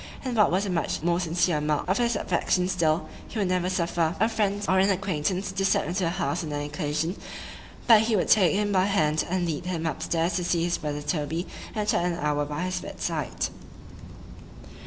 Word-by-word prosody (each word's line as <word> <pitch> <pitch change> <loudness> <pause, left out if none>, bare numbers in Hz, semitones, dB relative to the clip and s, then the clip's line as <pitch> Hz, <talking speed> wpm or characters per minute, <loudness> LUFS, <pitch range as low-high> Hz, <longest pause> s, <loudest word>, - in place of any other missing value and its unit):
—And 250 -2 -2
what 210 -2 +5
was 190 +4 +1
a - - -3
much 165 -2 -1
more 170 0 +2
sincere 170 -2 +1
mark 150 -1 0
of 190 +4 +1
his 235 -1 +2
affection 180 0 0
still, 170 -3 +1 0.2
he - - -8
would 200 -4 +1
never 180 0 +1
suffer 170 -2 0
a 220 - +4
friend 205 -2 -1
or 190 0 +3
an 195 +1 +4
acquaintance 190 0 -1
to 195 0 -2
step 195 - +2
into 175 +5 -2
the - - +1
house 145 -2 -1
on 155 - -5
any 145 0 -2
occasion, 150 +4 -2 0.7
but 225 -3 +7
he 220 0 +1
would 190 - +1
take 195 -4 +5
him 205 0 +1
by 185 -1 +3
the - - -1
hand, 155 -6 +2
and 180 0 0
lead 165 +1 -3
him 165 -3 -2
up 160 - -2
stairs 165 +2 0
to 180 - -1
see 170 -1 +1
his 175 0 0
brother 150 -1 -4
Toby, 160 +2 -2 0.3
and 210 -1 -1
chat 175 - +2
an 175 -1 0
hour 145 -2 0
by 150 +4 -4
his 185 0 -2
bed - - -9
side. - - -2
180 Hz, 220 wpm, -26 LUFS, 160-195 Hz, 0.7 s, but